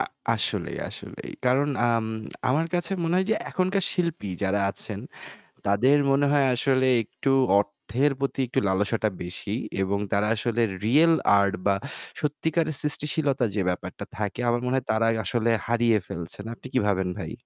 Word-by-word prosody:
আ - - +2 0.3
আসলেই, - - -1
আসলেই। - - -8 0.2
কারণ 135 +3 +3 0.2
আম 115 -1 +1 0.4
আমার 155 +6 +2
কাছে 175 +2 0
মনে 165 +1 0
হয় 190 +1 +2
যে - - +4
আ - - -4
এখনকার 185 +1 +1
শিল্পী 170 - -2
যারা 100 +1 +1
আছেন - - -4 0.7
তাদের 120 +9 +4
মনে 140 +1 +3
হয় 140 -2 +4
আসলে 130 0 +2 0.7
অর্থের 115 +7 -1
প্রতি 140 0 -2
একটু 120 - 0
লালসাটা 105 +3 +1
বেশি। 95 +4 -4 0.3
এবং 100 +1 0
তারা 100 +1 +2
আসলে 120 +1 -1 0.2
রিয়াল 160 +8 +5 0.3
আর্ট 100 -1 +2
বা 100 - +4 0.5
সত্যিকারের 155 +1 0
সৃষ্টিশীলতা 145 -3 +1
যে 100 - +1
ব্যাপারটা 90 - -5
থাকে 105 +1 -3
আমার 120 0 +1
মনে 125 - 0
হয় 130 - -2
তারা 110 +1 +2 0.2
আসলে 115 -1 +1 0.2
হারিয়ে 115 -1 +3
ফেলছে। 85 0 -6 0.2
আপনি - - -11
কি 130 - +3
ভাবেন 95 -2 +1
ভাই? - - -5
120 Hz, 160 wpm, -25 LUFS, 105-145 Hz, 0.7 s, রিয়াল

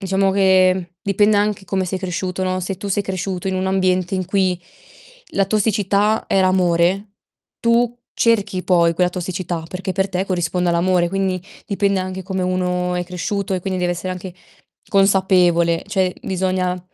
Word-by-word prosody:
diciamo 195 0 +1
che, 190 -1 +4
mhmm, 185 -2 -5 0.2
dipende 205 +2 +3
anche 205 -1 0
come 190 0 -1
sei 185 +1 -3
cresciuto, 185 0 -3
no, 185 0 -1
se 185 +1 -4
tu 200 - -7
sei 200 +1 0
cresciuto 190 -1 -3
in 190 - -1
un 185 0 -1
ambiente 185 -1 +1
in 185 -1 -1
cui 185 -3 +1 0.7
la 195 - +2
tossicità 210 +1 +1
era 190 -1 +3
amore, 185 +2 +1 0.5
tu 235 +1 +2 0.2
cerchi 205 -5 +1
poi 170 -2 +3
quella 180 +1 +2
tossicità, 175 -2 -4
perché 190 +2 -5
per 190 +1 0
te 185 0 -1
corrisponde 180 -1 -1
all'amore. 175 0 +2
Quindi 190 -1 -1 0.2
dipende 200 -1 +1
anche 185 0 -5
come 190 0 -3
uno 180 0 -1
è 180 - -1
cresciuto 190 +2 -3
e 185 - -2
quindi 185 +1 -3
deve 175 0 +1
essere 175 +2 -4
anche 180 0 -7 0.6
consapevole. 185 -4 +3
Cioè 190 -2 0
bisogna 185 -1 -1
185 Hz, 165 wpm, -20 LUFS, 180-195 Hz, 0.7 s, che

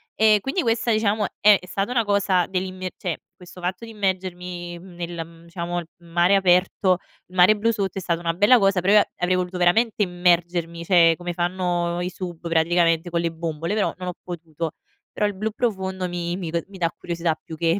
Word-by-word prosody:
E 215 -1 +5
quindi 270 - -1
questa 230 0 +1
diciamo 215 -1 +1 0.2
è 210 -1 +7
è - - -13
stata 195 +3 -2
una 240 -2 +2
cosa 200 -3 +2
dell'immie 185 0 -3
cioè 175 -4 -3 0.2
questo 180 0 -13
fatto 180 +3 -3
di - - -11
immergermi, 180 -3 -3
mhmm, 180 0 -13
nel, 170 -1 -5
mhmm, 165 0 -17
diciamo 170 +1 -4
il 170 - -8 0.2
mare 175 +3 +3
aperto 185 0 +3 0.3
il 180 - -16
mare 185 +4 +6
blu 230 +2 +2
sotto 200 -4 -2
è - - -2
stata 170 -2 -1
una 170 -1 -1
bella 210 +7 +6
cosa 195 -3 +3
però 195 +3 +3
io 210 - +8
a - - +1
avrei 180 +1 +1
voluto 180 0 -2
veramente 210 +5 +3
immergermi, 175 -2 0
cioè 165 -2 +5
come 175 0 -4
fanno 175 -1 -1
i 180 - -2
sub 175 -2 -7
praticamente 165 +1 +2
con 170 0 0
le 170 -1 -1
bombole, 165 +2 -3
però 210 -1 +1
non 180 0 -4
ho - - -4
potuto. 165 -2 -5 0.4
Però 210 - 0
il 205 - -3
blu 215 +3 -2
profondo 190 -5 -2
mi 175 0 -3
mi 170 -4 -5
d 170 -1 -1
mi 195 - -12
dà 170 -2 0
curiosità 170 -1 -2
più 160 - -8
che 165 +3 +1
180 Hz, 210 wpm, -23 LUFS, 170-195 Hz, 0.4 s, io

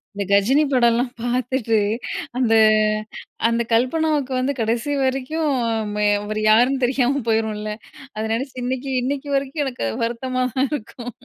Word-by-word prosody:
இந்த 200 - -2
கஜினி 240 +10 +4
படம்லாம் 240 0 +3
பார்த்துட்டு 245 -2 0 0.6
அந்த 235 -3 +2 0.9
அந்த 230 0 +1
கல்பனாவுக்கு 275 +3 +1
வந்து 270 +2 0
கடைசி 230 +5 -1
வரைக்கும், 270 +4 -1 0.8
அவரு 215 +1 -3
யாருன்னு 250 +4 +3
தெரியாம 265 +2 +1
போயிரும்ல 215 -1 -1 0.4
அத 215 - -3
நினச்சு 260 +4 -3
இன்னைக்கு, 260 +2 -3
இன்னைக்கு 280 +3 -3
வரைக்கும் 275 +2 -1
எனக்கு 255 - -3 0.2
வருத்தமா 255 +2 -2
தான் 265 0 +1
இருக்கும். 245 -2 -6
255 Hz, 125 wpm, -21 LUFS, 230-270 Hz, 0.9 s, கஜினி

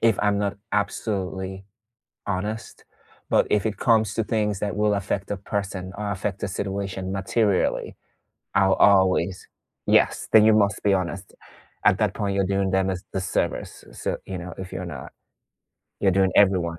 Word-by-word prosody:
if 115 -4 +3
I'm 105 -1 +2
not 100 -1 -1 0.2
absolutely 95 -2 -2 0.6
honest, 105 +3 -4 0.5
but - - +3
if 105 0 +2
it 110 -1 -1
comes 110 -3 +3
to 115 - +1
things 105 -3 0
that 105 -1 -2
will 105 0 +2
affect 100 0 -3
a 100 - -1
person, 95 -1 -4
or 105 0 -3
affect 100 0 -3
the 100 - -2
situation 95 -1 -3
materially, 100 0 0 0.6
I'll 95 0 +4
always 95 -2 +3 0.4
Yes, - - +3
then 110 -1 +8
you 110 - +6
must 105 -1 +2
be 100 -1 +3
honest. 95 0 -3 0.5
At - - +5
that - - +1
point, 100 -1 -2
you're 100 0 +2
doing 95 0 0
them 95 0 +2
a 95 - -1 0.2
disservice, 95 0 -2
so, - - -3
you 95 - -5
know, 90 0 -7
if 95 -1 -7
you're 90 - -4
not 70 -7 -8 0.9
you're 100 - +4
doing 95 -1 +3
everyone 90 -4 +3
100 Hz, 165 wpm, -24 LUFS, 95-105 Hz, 0.9 s, then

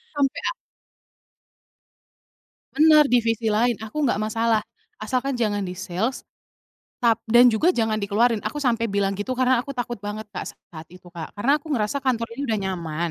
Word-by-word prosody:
Sampai 280 -2 0
ak - - -4 2.2
Bener, 305 +1 +6
"Divisi 230 -2 +2
lain 235 +3 +2
aku 220 +6 -8
nggak 240 - +1
masalah 220 0 +1 0.4
asalkan 260 +1 -2
jangan 205 -3 0
di 180 -1 -5
sales. 190 +7 -3 0.8
Tap 230 -2 +4
dan 240 +2 +6
juga 320 +11 +2
jangan 220 -2 0
dikeluarin," 220 +3 +2
aku 295 -1 -3
sampai 230 -2 +1
bilang 200 -1 0
gitu 255 +5 -2
karena 255 0 +3
aku 275 +3 -4
takut 240 -2 -4
banget 210 +1 -6
Kak 195 - -6
saat 160 -1 -13
itu, 180 -1 -14
Kak, 170 -2 -8
karena 225 +7 +1
aku 295 - -21
ngerasa 220 +2 0
kantor 235 -3 0
ini - - -3
udah 220 -2 0
nyaman, 170 -3 -3
225 Hz, 165 wpm, -23 LUFS, 205-250 Hz, 2.2 s, Bener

